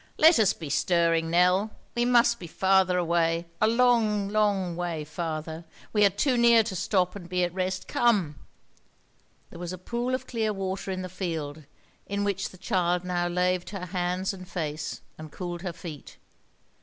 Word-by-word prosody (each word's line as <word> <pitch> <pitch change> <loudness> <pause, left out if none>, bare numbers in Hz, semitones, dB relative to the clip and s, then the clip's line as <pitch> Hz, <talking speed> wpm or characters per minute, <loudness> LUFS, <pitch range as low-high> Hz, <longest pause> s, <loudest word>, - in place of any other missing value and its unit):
"Let 320 -3 +7
us 210 -3 +5
be 155 -4 -7
stirring, 165 0 +2
Nell. 180 +5 +3 0.2
We 240 0 +1
must 235 -1 +4
be 175 - -8
farther 190 +1 +3
away—a 170 +1 +1
long, 225 -4 +3
long 200 -4 +1
way 170 -3 -3
farther. 160 +1 -5 0.3
We 210 -1 +4
are - - +6
too 245 +7 +1
near 235 -1 +6
to 210 -3 -5
stop 180 0 0
and 175 -4 -9
be 180 0 +1
at 175 -1 -1
rest. 185 0 -2
Come." 195 - +1 1.1
There 170 - -10
was 175 0 -5
a - - -6
pool 240 +7 -2
of 255 - -6
clear 220 -3 -1
water 195 0 -4
in 185 -1 -3
the - - -4
field, 160 -5 -5 0.4
in 200 0 -2
which 200 -1 -1
the 185 - -15
child 180 -2 0
now 175 -1 -1
laved 180 0 0
her 195 -3 -5
hands 180 +1 -2
and 185 -1 -10
face, 155 -4 -4 0.2
and 155 -1 -9
cooled 175 0 -5
her 180 -1 -3
feet. 160 -3 -9
185 Hz, 175 wpm, -27 LUFS, 170-205 Hz, 1.1 s, Let